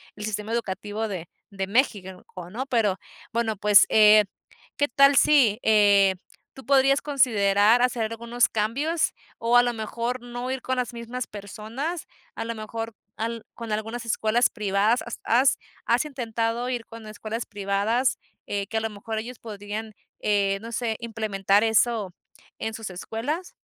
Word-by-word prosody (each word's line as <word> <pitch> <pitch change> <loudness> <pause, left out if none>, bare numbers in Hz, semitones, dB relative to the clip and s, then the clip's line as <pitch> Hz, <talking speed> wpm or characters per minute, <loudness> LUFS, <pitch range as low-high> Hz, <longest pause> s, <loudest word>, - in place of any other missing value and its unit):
el 210 - -6
sistema 210 0 -4
educativo 215 -1 -3
de 180 -5 -5 0.2
de 195 -1 -3
México, 200 -5 0
co 180 -2 -10
¿no? 240 +8 -4
Pero, 225 -7 +1 0.3
bueno, 230 -1 0
pues, 205 0 +6
eh, 215 -1 +7 0.5
¿qué 285 - +2
tal 275 +3 +5
si, 260 -8 +5
eh, 205 -3 +5 0.4
tú 265 - -12
podrías 275 0 +4
considerar 225 -5 +3
hacer 235 -3 +1
algunos 235 +1 +1
cambios, 280 +10 0 0.3
o 235 +1 +3
a 245 - +7
lo 245 0 0
mejor, 235 +2 -3
no 245 +1 -5
ir 265 -1 -3
con 260 - -1
las 250 -1 -2
mismas 235 +2 -5
personas, 220 - -6 0.3
a 225 - -4
lo 230 - -3
mejor, 225 +1 -5 0.2
al 230 0 -3
con 230 -2 -7
algunas 225 +3 -3
escuelas 230 +1 +2
privadas, 210 +2 +1
has 235 - -7
has 255 +4 +3 0.3
has 240 +5 +2
intentado 235 -3 -2
ir 240 -3 -3
con 225 -1 -11
escuelas 220 +2 -5
privadas, 205 +5 0 0.3
eh, 200 -1 -2
que 225 - -3
a - - 0
lo 225 - -2
mejor, 220 +2 -6
ellos 240 +2 -8
podrían, 215 0 -6 0.3
eh, 200 -1 +1
no 230 +1 -8
sé, 230 -1 -1
implementar 210 -3 +1
eso, 220 -3 +2 0.5
en 220 - -3
sus 225 -2 -6
escuelas? 285 - -4
225 Hz, 160 wpm, -25 LUFS, 210-245 Hz, 0.5 s, eh